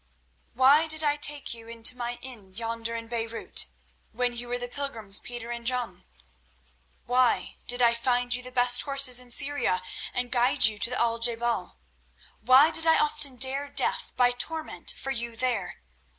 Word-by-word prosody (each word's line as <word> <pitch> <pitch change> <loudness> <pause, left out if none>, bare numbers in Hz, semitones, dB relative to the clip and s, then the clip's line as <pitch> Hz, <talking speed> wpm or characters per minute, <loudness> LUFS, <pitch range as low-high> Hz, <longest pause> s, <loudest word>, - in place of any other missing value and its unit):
"Why 280 +6 +4
did 315 0 0
I 295 -1 +1
take 290 -2 +1
you 230 -1 -10
into 230 +2 +2
my 240 0 -5
inn 220 -8 -10
yonder 230 +2 -5
in 230 0 -6
Beirut 230 -1 -2 0.4
when 245 +1 -2
you 240 +1 -5
were 245 0 -3
the 245 0 -6
pilgrims 230 -6 -1
Peter 240 -1 -8
and 235 0 -6
John? 235 -6 -3 1.0
Why 250 0 0
did 245 0 +3
I 235 0 +4
find 245 +1 0
you 250 - -1
the 255 0 -9
best 245 -1 +4
horses 275 -3 +5
in 250 -1 -9
Syria 275 -7 +3 0.3
and 245 0 -4
guide 245 0 +2
you 215 -1 0
to 230 - -1
the 250 - -2
Al 230 0 0
je 235 0 +4
bal? 235 0 -3 0.6
Why 270 +5 +5
did 325 +1 +1
I 320 - +5
often 300 -3 -1
dare 270 +3 +1
death - - -1
by 245 -1 +4
torment 310 +6 -4
for 270 - -5
you 235 -2 -5
there? 225 - -3
245 Hz, 180 wpm, -26 LUFS, 230-265 Hz, 1.0 s, horses